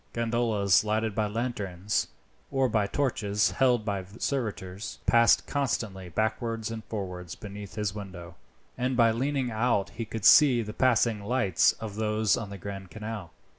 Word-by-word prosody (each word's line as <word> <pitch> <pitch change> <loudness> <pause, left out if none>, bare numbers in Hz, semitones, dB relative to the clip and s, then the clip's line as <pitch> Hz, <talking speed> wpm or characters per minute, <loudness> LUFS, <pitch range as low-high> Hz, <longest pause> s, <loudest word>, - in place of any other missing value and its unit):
Gondolas 115 -4 +2
lighted 110 0 0
by 105 0 0
lanterns, 105 -4 -2 0.4
or 135 -1 +2
by 110 -4 +1
torches 105 -5 0
held 125 -4 +2
by 100 -3 -2
servitors, 105 -8 -3
passed 115 -2 +5
constantly 110 -10 -2
backwards 110 +3 -2
and 110 -1 -6
forwards 90 -5 -5
beneath 100 -1 -9
his 105 -3 -2
window, 90 -4 -8 0.5
and 125 0 0
by 115 -2 +5
leaning 130 +1 -1
out 110 -3 +1
he 115 +1 -5
could 110 -1 -5
see 130 -6 +7
the 105 0 -7
passing 115 -4 +2
lights 100 -5 +3
of 105 -2 -8
those 110 -1 +2
on 115 -5 -5
the 100 - -7
Grand 95 -1 -7
Canal. 105 -3 -6
110 Hz, 150 wpm, -28 LUFS, 100-115 Hz, 0.5 s, see